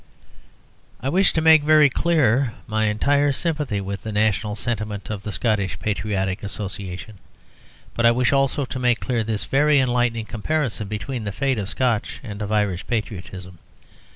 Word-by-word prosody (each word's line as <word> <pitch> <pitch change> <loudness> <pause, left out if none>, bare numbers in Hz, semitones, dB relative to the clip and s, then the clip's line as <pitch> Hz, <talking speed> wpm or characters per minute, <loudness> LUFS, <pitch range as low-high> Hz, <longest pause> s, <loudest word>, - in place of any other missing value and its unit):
I 130 - -2
wish 190 +6 +3
to 160 - +1
make 160 -1 +7
very 155 0 +6
clear 135 -5 +2
my 110 0 0
entire 140 +7 +2
sympathy 150 - -1
with 100 0 -5
the 110 - -5
national 105 0 0
sentiment 110 -5 -3
of 105 -2 -4
the 105 - -5
Scottish 105 -3 0
Patriotic 100 -2 -2
Association. 100 0 -6 0.7
But 120 0 +3
I - - +6
wish 125 +3 +2
also 135 0 +1
to 130 +1 -6
make 125 -2 +2
clear 120 -3 -1
this 110 -1 -2
very 145 +2 +3
enlightening 120 -3 +1
comparison 120 -1 -2
between 110 +4 -4
the 100 - -3
fate 130 +3 -1
of 100 -1 -4
Scotch 120 -3 -1
and 105 -3 -7
of 105 0 -3
Irish 105 -4 0
patriotism. 95 -5 -5
110 Hz, 160 wpm, -22 LUFS, 105-135 Hz, 0.7 s, make